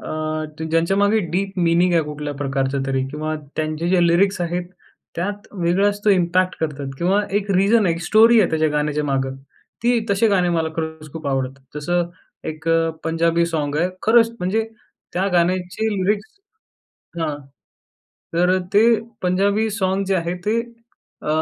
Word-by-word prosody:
अ, - - -8 0.6
ज्यांच्यामागे 195 +6 +2
deep 195 +1 -2
meaning 175 +1 +3
आहे 165 - +4
कुठल्या 150 -1 -5
प्रकारचं 135 -1 -1
तरी 135 -1 0
किंवा 155 +2 -3 0.2
त्यांचे 155 +2 -2
जे 185 0 +3
लिरिक्स 185 +3 +2
आहेत 175 +1 -2 0.5
त्यात 205 +4 -4
वेगळाच 195 +2 +1
तो 210 - +5
इम्पॅक्ट 185 0 +2
करतात 145 -3 -3
किंवा 190 +4 +2 0.2
एक 205 0 -5
रीजन 200 +3 +4
आहे, 170 - +2
एक 170 - -7
स्टोरी 225 +5 +6
आहे 190 - +2
त्याच्या 155 -1 +2
गाण्याच्या 150 0 0
मागे. 135 -2 0 0.5
ती 240 0 +3
तसे 200 +3 +3
गाणे 185 -3 +2
मला 165 -2 0
खरंच 160 -2 -5
खूप 160 -2 -7
आवडतात. 135 0 -2 0.2
जसं 175 +3 -1 0.4
एक 155 +1 -6
अ, 165 0 +3
पंजाबी 165 +1 +2
साँग 150 -3 -2
आहे, 170 +4 +2
खरंच 230 +1 +5
म्हणजे 190 +5 0 0.5
त्या 185 +2 0
गाण्याची 180 +4 +1
लिरिक्स 205 - 0 0.9
हां, 155 -3 -1 1.0
तर 180 +2 +3 0.2
ते 205 - +6 0.4
पंजाबी 200 +4 +2
साँग 195 -2 0
जे 195 - +1
आहे 170 0 -2
ते 225 +2 +2 0.6
अ, - - -9
175 Hz, 155 wpm, -21 LUFS, 155-195 Hz, 1.0 s, स्टोरी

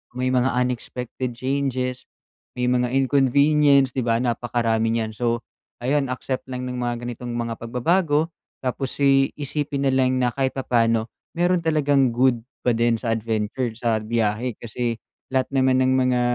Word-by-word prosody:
may 130 0 0
mga 130 0 +2
unexpected 125 0 -3
changes, 130 -1 -2 0.5
may 125 - -2
mga 125 0 +1
inconvenience, 140 +1 +4
'di 125 -2 -2
ba? 115 - +3
Napakarami 115 -2 0
nyan. 110 -1 -1
So, 115 +1 -1 0.4
ayan, 140 +2 +1
accept 130 +1 -4
lang 125 -1 -5
ng 125 0 -4
mga 120 -1 -2
ganitong 120 0 -5
mga 115 -1 -3
pagbabago 150 +6 +1 0.3
tapos 130 +1 -2
i 135 -1 +4
isipin 145 -1 -2
na 135 - +3
lang 130 -1 +2
na 125 -1 +1
kahit 135 -1 -1
papaano 115 -3 +1 0.2
meron 175 +1 +2
talagang 145 -4 +2
good 125 -1 +3 0.2
pa 125 - +4
din 115 0 +2
sa 115 0 -2
adventure 115 +2 -2
sa 115 -1 0
biyahe. 110 +1 -1
Kasi 120 +1 -3 0.3
lahat 130 0 0
naman 130 -1 +3
ng 130 0 +3
mga, 125 -1 +2
125 Hz, 155 wpm, -23 LUFS, 120-135 Hz, 0.5 s, inconvenience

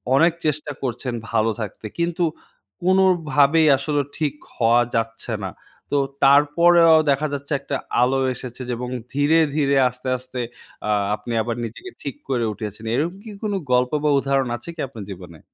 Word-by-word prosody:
অনেক 165 +4 +5
চেষ্টা 150 0 -1
করছেন 125 0 -3 0.2
ভালো 110 +1 +2
থাকতে, 110 +1 -6
কিন্তু 170 +1 0 0.6
কোনোভাবেই 165 -5 +4
আসলে 145 +2 0 0.2
ঠিক 150 -3 0 0.2
হওয়া 120 0 +4
যাচ্ছে 115 +1 -2
না। 95 - -4 0.4
তো - - +4 0.3
তারপরেও 160 +4 +6
দেখা 140 +2 +2
যাচ্ছে, 140 +1 -4
একটা 140 0 -4 0.3
আলো 130 +2 +3 0.2
এসেছে। 125 0 -9
যে, 125 - -1
এবং 125 +1 -4 0.2
ধীরে, 145 +4 +3 0.2
ধীরে, 140 -2 +2
আস্তে, 125 +1 -10
আস্তে 130 0 -8 0.5
আ - - -1 0.3
আপনি 110 +3 -6
আবার 115 +1 -2
নিজেকে 375 - -9
ঠিক - - -5
করে 120 -3 +1
উঠেছেন। 105 +1 -7
এরকম 165 +7 0
কি 220 - -9
কোনো 205 -2 -1 0.2
গল্প, 125 0 +3
বা 150 - +3
উদাহরণ 135 -2 0
আছে 120 - -11
কি 160 - -5
আপনার 115 -5 -9
জীবনে? 90 -4 -10
135 Hz, 160 wpm, -22 LUFS, 120-155 Hz, 0.6 s, তারপরেও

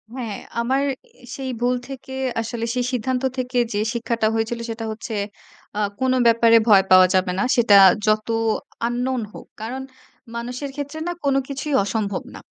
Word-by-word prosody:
হ্যাঁ, 230 -6 -4 0.3
আমার 265 +4 +1 0.5
সেই 265 -1 -5
ভুল 245 +1 +2
থেকে 265 -1 -8 0.3
আসলে 230 0 -4
সেই 250 -1 0
সিদ্ধান্ত 255 +1 -1
থেকে 250 0 -2 0.2
যে 205 - 0
শিক্ষাটা 230 -1 0
হয়েছিল 225 +1 -1
সেটা 225 0 -4
হচ্ছে, 220 +1 -6 0.6
আ - - 0 0.2
কোনো 260 0 +2
ব্যাপারে 230 0 +6
ভয় 195 -2 +7
পাওয়া 185 0 +8
যাবে 185 -1 +2
না। - - +2
সেটা 230 -4 +5 0.3
যত 215 0 +2 0.6
আন্নোন 250 +1 -1
হোক। - - -10 0.2
কারণ 250 +4 -4 0.5
মানুষের 245 +4 -4
ক্ষেত্রে 290 +2 -5
না, - - 0
কোনো 275 -1 +3
কিছুই 280 +1 -4
অসম্ভব 200 -1 -2
না। - - -8
240 Hz, 160 wpm, -22 LUFS, 225-260 Hz, 0.6 s, পাওয়া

